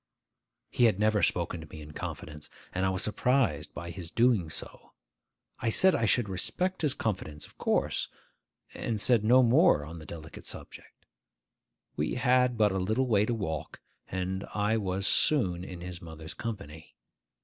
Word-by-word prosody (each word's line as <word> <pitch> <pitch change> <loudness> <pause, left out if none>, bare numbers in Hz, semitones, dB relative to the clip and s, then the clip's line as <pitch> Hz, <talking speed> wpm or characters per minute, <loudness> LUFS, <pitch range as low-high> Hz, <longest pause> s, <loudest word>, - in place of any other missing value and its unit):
He 120 - +3
had 110 -5 +3
never 105 0 +2
spoken 85 -1 +1
to 80 - -10
me 80 - -10
in 75 0 -10
confidence, 75 0 -7 0.2
and 95 +1 +1
I - - +2
was 95 -1 -1
surprised 110 - +1
by 85 0 -6
his 85 -2 -7
doing 115 -7 +2
so. - - -7 0.7
I 115 - 0
said 185 +11 +5
I 115 - +1
should 115 +1 +3
respect 180 - -2
his 145 -4 +1
confidence, 85 -9 -3
of - - -19
course, - - 0 0.7
and 110 -2 -3
said 115 0 +4
no 125 +4 +6
more 125 - +4
on 85 +2 -8
the 80 - -11
delicate 80 -2 -9
subject. - - -10 0.9
We 75 - -1
had 125 -1 +3
but 105 -2 +4
a 95 - -1
little 110 +8 +1
way 105 -4 +2
to 120 - 0
walk, 80 -8 -4 0.3
and 95 +1 -3
I 105 +1 +2
was 95 -2 -1
soon 95 - +3
in 90 -2 -8
his 90 0 -7
mother's 80 -1 -9
company. 80 -9 -7
100 Hz, 170 wpm, -29 LUFS, 85-115 Hz, 0.9 s, no